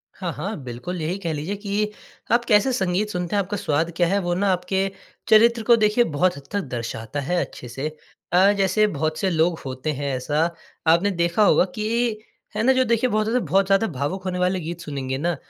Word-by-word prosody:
हाँ, 180 -3 -4
हाँ, 205 +8 -4
बिल्कुल। 125 +9 -5
यही 165 +5 -2
कह 170 -4 -3
लीजिए 155 +7 -3
कि 205 +1 -2 0.4
आप 235 +1 +3
कैसे 215 +2 +4
संगीत 190 0 0
सुनते 180 -1 -3
हैं 200 - +3
आपका 200 +3 -4
स्वाद 165 -3 0
क्या 175 0 +2
है 195 +3 +1
वो 175 -1 -1
ना 200 +3 +1
आपके 190 +2 0 0.4
चरित्र 230 +1 +5
को 235 - +9
देखिए 215 +2 +3
बहुत 175 -1 0
हद 140 - -10
तक 205 - 0 0.2
दर्शाता 115 +2 -4
है 175 +6 0
अच्छे 125 - -11
से। 135 +5 -4 0.5
अ, 190 +3 +6
जैसे 195 +2 +3
बहुत 155 -2 -2
से 195 - +1
लोग 165 0 +1
होते 130 +3 -3
हैं 140 -1 -2
ऐसा 145 +5 0 0.4
आपने 170 +5 +4
देखा 170 +3 +1
होगा 185 - +5
कि 225 +1 0 0.4
है 215 - 0
ना 265 +2 +5
जो 260 - +3
देखिए 235 +1 +1
बहुत 215 -1 +1
ज़्यादा, 235 -1 0
बहुत 190 +6 +3
ज़्यादा 195 +3 +3
भावुक 165 +5 -3
होने 180 -1 -2
वाले 180 +1 +1
गीत 170 0 -6
सुनेंगे 135 -4 -4
ना। 170 +4 -1
180 Hz, 215 wpm, -23 LUFS, 155-210 Hz, 0.5 s, को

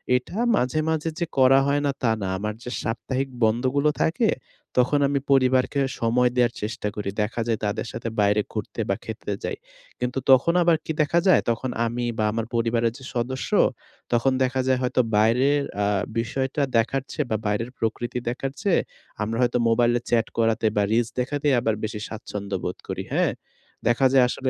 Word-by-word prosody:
এটা 125 +10 -3 0.2
মাঝে, 125 +1 0
মাঝে 160 0 0
যে 170 - +1
করা 130 +1 +6
হয় 145 +1 +2
না 140 - +2
তা 115 - +3
না। 95 - -2
আমার 105 +2 -3
যে 125 - -6
সাপ্তাহিক 130 +4 -2
বন্ধগুলো 130 +6 +2
থাকে 215 +7 +1 0.5
তখন 135 +4 +3
আমি 140 0 +1
পরিবারকে 130 +1 +3 0.2
সময় 120 +2 +3
দেয়ার 120 -1 +3
চেষ্টা 105 0 -3
করি। 105 -2 -3
দেখা 115 +2 -3
যায় 115 -2 0
তাদের 105 +3 -2
সাথে 115 0 -4
বাইরে 105 +1 +3
ঘুরতে - - -4
বা - - +2
খেতে - - -4
যাই। - - -3 0.4
কিন্তু 125 +2 -1
তখন 135 +6 +5
আবার 170 -1 +4
কি - - -2
দেখা 155 +3 +2
যায়? 185 - +6
তখন 115 +3 -3 0.2
আমি 120 +1 -2
বা 110 - +1
আমার 115 +1 -2
পরিবারের 115 0 +1
যে 135 - -13
সদস্য 125 +2 -2 0.6
তখন 120 +3 +3
দেখা 130 +1 0
যায় 130 -1 +3
হয়তো 125 0 +2 0.2
বাইরের 130 +7 +3 0.2
আ 100 - +2 0.3
বিষয়টা 130 +5 -2 0.2
দেখার 125 +4 +1
চেয়ে 150 -4 -2
বা 110 - +2
বাইরের 105 +4 -1
প্রকৃতি 120 +2 -2
দেখার 135 +2 -3
চেয়ে 195 -4 +3 0.4
আমরা 115 +2 -2
হয়তো 125 0 +2
মোবাইলে 120 +1 +3
চ্যাট 115 -1 +2
করাতে 115 -1 +1
বা 105 - +4
রিলস 115 0 +2
দেখাতেই 145 +3 0
আবার 110 -2 0
বেশি 105 -1 -3
স্বাচ্ছন্দ্য 100 -2 -5
বোধ 90 - -3
করি, - - -3
হ্যাঁ? - - +2 0.5
দেখা 120 +3 +3
যায় 130 -2 +6
আসলে 130 +1 -2
125 Hz, 180 wpm, -24 LUFS, 115-135 Hz, 0.6 s, করা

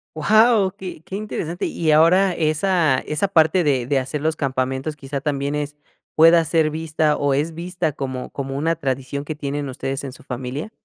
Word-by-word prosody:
Wao, 210 +3 +4
qué 185 -5 -8
qué 190 - -7
interesante. 180 -5 -4
Y 160 -2 0
ahora 180 +5 +5
esa 155 -2 +2
esa 155 +6 -2
parte 165 +1 +4
de 135 -5 +1
de 140 +1 +1
hacer 135 +3 -2
los 160 0 0
campamentos, 135 +2 -2
quizá, 135 0 -5
¿también 140 -1 -2
es 150 0 -4 0.4
pueda 165 +1 +6
ser 160 -1 +2
vista, 155 -1 0
o, 145 -1 +1
es 150 +4 -1
vista 170 -2 -3
como 130 -3 -5
como 135 0 -4
una 165 +3 +1
tradición 135 -1 -3
que 155 +1 -5
tienen 145 -1 -4
ustedes 135 +2 -4
en 135 - -5
su 130 - -15
familia? 130 - -5
150 Hz, 185 wpm, -21 LUFS, 140-165 Hz, 0.4 s, pueda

